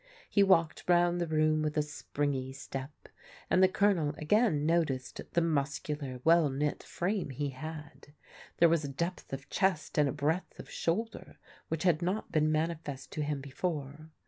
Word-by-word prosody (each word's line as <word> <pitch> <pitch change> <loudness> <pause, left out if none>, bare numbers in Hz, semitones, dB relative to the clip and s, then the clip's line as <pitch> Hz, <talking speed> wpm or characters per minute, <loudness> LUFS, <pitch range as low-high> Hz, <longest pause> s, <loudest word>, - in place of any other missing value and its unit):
He 200 - +4
walked 170 -5 +3
round 175 0 +3
the 170 - 0
room 155 0 +2
with 155 0 -1
a 150 - +3
springy 145 -3 -3
step, 135 0 -8 0.4
and 185 - +5
the 190 - +8
Colonel 185 -7 +2
again 155 -2 +2
noticed 155 -6 0
the 170 - +3
muscular, 140 -3 -2
well 165 -2 +5
knit 145 +2 -1
frame 185 -2 -2
he 140 +2 -3
had. 150 +2 -8 0.5
There 170 - +7
was 165 -1 +2
a - - -3
depth 170 +6 -4
of 135 +1 -6
chest 185 -7 +1
and 145 -2 +4
a - - -1
breadth 155 +5 -1
of - - -10
shoulder 220 +7 -3 0.3
which 160 0 -2
had 175 -3 +3
not 185 +5 -2
been 155 -1 +2
manifest 155 -3 -2
to 155 - -3
him 145 -1 -2
before. 150 +1 -4
155 Hz, 170 wpm, -31 LUFS, 145-170 Hz, 0.5 s, the